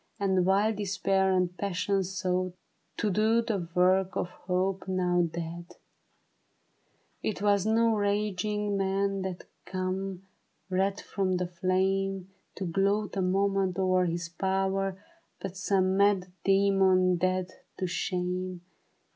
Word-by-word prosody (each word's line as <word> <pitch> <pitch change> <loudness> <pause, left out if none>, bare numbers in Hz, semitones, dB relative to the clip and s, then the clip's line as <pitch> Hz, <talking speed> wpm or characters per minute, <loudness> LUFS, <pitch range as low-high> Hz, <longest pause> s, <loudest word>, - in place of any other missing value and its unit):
And 190 -2 +2
wild 205 +2 +3
despair 195 -1 +1
and 180 -1 +1
passion 195 +1 0
sought 185 -1 -2 0.4
To 210 - 0
do 220 +4 +3
the 200 -7 -2
work 185 +1 +3
of 175 - -1
hope, 185 +1 -2
now 180 -1 +1
d2ad, 170 +1 -6 1.5
It 210 - -2
was 205 -1 +3
no 225 +1 +3
raging 210 0 0
man 195 0 0
that 185 -1 -5 0.2
came 185 0 -3 0.5
Red 195 +2 +1
from 185 -2 -1
the 180 - -1
flame 190 +1 -1 0.2
To 190 - -4
gloat 200 +4 0
a 195 - 0
moment 195 0 +1
o'er 185 -1 +2
his 170 0 -2
power. 190 +2 -1 0.4
But 195 -1 -6
some 190 0 +1
mad 200 -2 +3
demon 195 -2 +4
dead 185 +1 0 0.3
to 190 - -1
shame. 180 0 -2
190 Hz, 120 wpm, -29 LUFS, 185-195 Hz, 1.5 s, demon